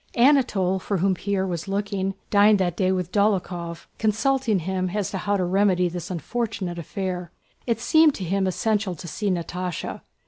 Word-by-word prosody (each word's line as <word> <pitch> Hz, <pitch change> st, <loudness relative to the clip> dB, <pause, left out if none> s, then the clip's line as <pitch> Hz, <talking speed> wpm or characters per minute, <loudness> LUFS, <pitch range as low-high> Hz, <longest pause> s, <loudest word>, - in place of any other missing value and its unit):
Anatole, 235 Hz, -8 st, +3 dB
for 200 Hz, +1 st, -2 dB
whom 190 Hz, +2 st, +2 dB
Pierre 195 Hz, +1 st, -1 dB
was 175 Hz, -2 st, -4 dB
looking, 195 Hz, -1 st, -2 dB, 0.2 s
dined 205 Hz, +1 st, +6 dB
that 180 Hz, -3 st, 0 dB
day 185 Hz, 0 st, +1 dB
with 180 Hz, -1 st, -2 dB
Dólokhov, 180 Hz, -5 st, 0 dB
consulting 225 Hz, +1 st, +1 dB
him 185 Hz, +1 st, -2 dB
as 205 Hz, -3 st, -1 dB
to 190 Hz, -, -3 dB
how 205 Hz, +1 st, 0 dB
to 185 Hz, -, 0 dB
remedy 185 Hz, -1 st, +2 dB
this 175 Hz, 0 st, -6 dB
unfortunate 185 Hz, 0 st, -3 dB
affair. 180 Hz, +1 st, -4 dB, 0.4 s
It 230 Hz, -2 st, +1 dB
seemed 315 Hz, +4 st, +4 dB
to 190 Hz, -, -5 dB
him 190 Hz, +2 st, 0 dB
essential 205 Hz, 0 st, 0 dB
to 170 Hz, -, -9 dB
see 205 Hz, +5 st, -2 dB
Natásha. 180 Hz, -1 st, -3 dB
190 Hz, 170 wpm, -24 LUFS, 180-210 Hz, 0.4 s, dined